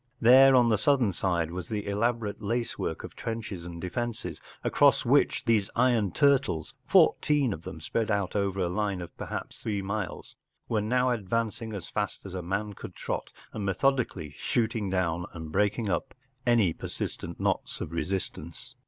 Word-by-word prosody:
Then 130 +3 +8
on 120 -2 +5
the 110 -2 +3
southern 125 -5 +3
side 85 -3 0
was 90 0 -6
the 105 -2 -2
elaborate 105 +1 -1
lace 115 +3 -2
work 80 - -3
of - - -9
trenches 105 -6 -5
and 85 -1 -7
defences, 120 +6 -4 0.2
across - - +4
which - - +3
these 110 -4 +2
iron 120 -5 +3
turtles, 140 - +2
fourteen 145 -7 +4
of 80 - -7
them 85 - -8
spread 110 +8 -1
out 100 -3 0
over 100 -1 0
a 90 - +2
line 100 +1 -1
of 85 - -8
perhaps - - -6
three 100 -3 -2
miles, 100 -1 -4 0.3
were 110 -2 +1
now 125 +4 +2
advancing 115 +1 -2
as 95 -4 -6
fast 105 -1 -3
as 95 - -7
a 95 - -3
man 100 +4 -2
could - - -9
trot, - - -3 0.2
and 105 - -4
methodically 100 - 0
shooting 110 -3 0
down 90 -2 0
and 80 -2 -7
breaking 105 +4 +1
up 135 +8 -2 0.3
any 115 -8 +4
persistent - - -5
knots - - -1
of - - -5
resistance. 85 - -4
105 Hz, 170 wpm, -28 LUFS, 90-115 Hz, 0.3 s, Then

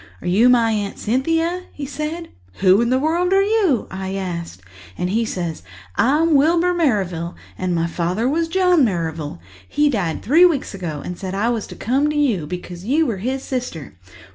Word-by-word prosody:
'Are - - -7
you 210 +8 +4
my 235 -2 +4
Aunt 205 -2 -2
Cynthia?' 330 +9 0
he 290 - -6
said. 305 +4 -5 0.2
'Who 190 - +4
in 235 - +1
the 255 - +3
world 340 +6 +1
are 390 0 +5
you?' 400 - +2
I 190 0 -4
asked. 170 - -5 0.3
And 180 - -2
he 225 +3 +1
says, 175 - -4 0.3
'I'm 305 +6 +3
Wilbur 335 +5 +3
Merrivale, 190 - 0 0.2
and 185 -1 -2
my 165 0 +1
father 180 +7 -1
was 325 +4 +1
John 360 -2 +3
Merrivale. 165 - -2 0.3
He 295 0 +2
died 180 - -2
three 315 +9 +5
weeks 330 -11 +2
ago 165 -7 -5
and 180 - -4
he - - -14
said 190 -1 -4
I 215 +4 +1
was 230 -3 -2
to - - -10
come 270 +6 +1
to 300 - -2
you, 225 - +1
because 180 +1 -7
you 290 +9 +2
were 230 -8 -2
his 260 +7 -3
sister.' 245 - -5
235 Hz, 190 wpm, -20 LUFS, 180-305 Hz, 0.3 s, are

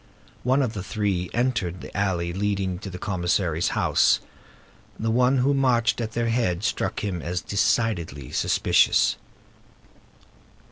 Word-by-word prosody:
One 130 +3 +2
of 115 -4 -2
the 100 - -4
three 95 -3 -2
entered 115 -8 -1
the - - -10
alley 90 -4 -1
leading 95 -2 -1
to 100 - -7
the 90 - -7
commissary's 90 -4 0
house. - - +3 0.8
The 115 +1 0
one 125 +3 +3
who 135 +3 +2
marched 120 -5 +2
at 110 -1 -4
their 115 0 0
head 110 -6 0
struck 120 - -1
him 95 -5 -2
as 85 +4 -2
decidedly 90 - 0
suspicious. - - +3
100 Hz, 135 wpm, -24 LUFS, 90-120 Hz, 0.8 s, house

